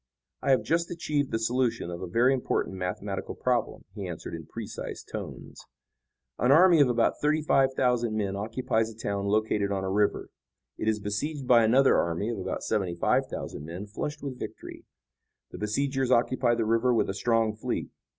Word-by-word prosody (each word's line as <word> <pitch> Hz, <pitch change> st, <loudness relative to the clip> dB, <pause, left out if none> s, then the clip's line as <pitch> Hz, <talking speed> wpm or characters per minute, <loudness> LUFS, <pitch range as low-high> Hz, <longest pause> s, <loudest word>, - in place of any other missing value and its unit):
"I -, -, -1 dB
have 130 Hz, -, +4 dB
just 170 Hz, +1 st, 0 dB
achieved 150 Hz, -5 st, -1 dB
the -, -, 0 dB
solution 120 Hz, -5 st, 0 dB
of 85 Hz, -, -6 dB
a -, -, -4 dB
very 120 Hz, +9 st, +3 dB
important 125 Hz, -6 st, -1 dB
mathematical 95 Hz, +2 st, -4 dB
problem," 125 Hz, -3 st, -1 dB
he 100 Hz, -3 st, -5 dB
answered 85 Hz, -1 st, -7 dB
in 80 Hz, -2 st, -7 dB
precise -, -, -6 dB
tones. -, -, -8 dB, 0.7 s
"An 125 Hz, -, +3 dB
army 170 Hz, +1 st, +7 dB
of 135 Hz, -, +5 dB
about 120 Hz, -1 st, +1 dB
thirty 150 Hz, +1 st, +2 dB
five 135 Hz, -3 st, +3 dB
thousand 120 Hz, -4 st, +1 dB
men 100 Hz, -2 st, -1 dB
occupies 110 Hz, +1 st, -1 dB
a 110 Hz, -, -15 dB
town 100 Hz, -3 st, -2 dB
located 105 Hz, -1 st, +1 dB
on 95 Hz, -1 st, -1 dB
a 95 Hz, -, -2 dB
river. 105 Hz, +1 st, 0 dB, 0.4 s
It 110 Hz, -, -4 dB
is 110 Hz, -1 st, +2 dB
besieged 130 Hz, +8 st, -3 dB
by 120 Hz, -2 st, +6 dB
another 130 Hz, +5 st, +5 dB
army 85 Hz, +6 st, -1 dB
of 115 Hz, -4 st, -3 dB
about 95 Hz, 0 st, -4 dB
seventy 95 Hz, -5 st, -1 dB
five 85 Hz, -, +1 dB
thousand -, -, -6 dB
men 85 Hz, +5 st, -6 dB
flushed 145 Hz, +9 st, -5 dB
with 135 Hz, -3 st, -5 dB
victory. -, -, -8 dB, 0.7 s
The -, -, -8 dB
besiegers 135 Hz, +5 st, 0 dB
occupy 120 Hz, 0 st, +3 dB
the 115 Hz, -1 st, 0 dB
river 115 Hz, +3 st, +2 dB
with -, -, +2 dB
a 95 Hz, -, -2 dB
strong 115 Hz, +1 st, +1 dB
fleet. 110 Hz, -, -3 dB
115 Hz, 185 wpm, -28 LUFS, 100-130 Hz, 0.7 s, army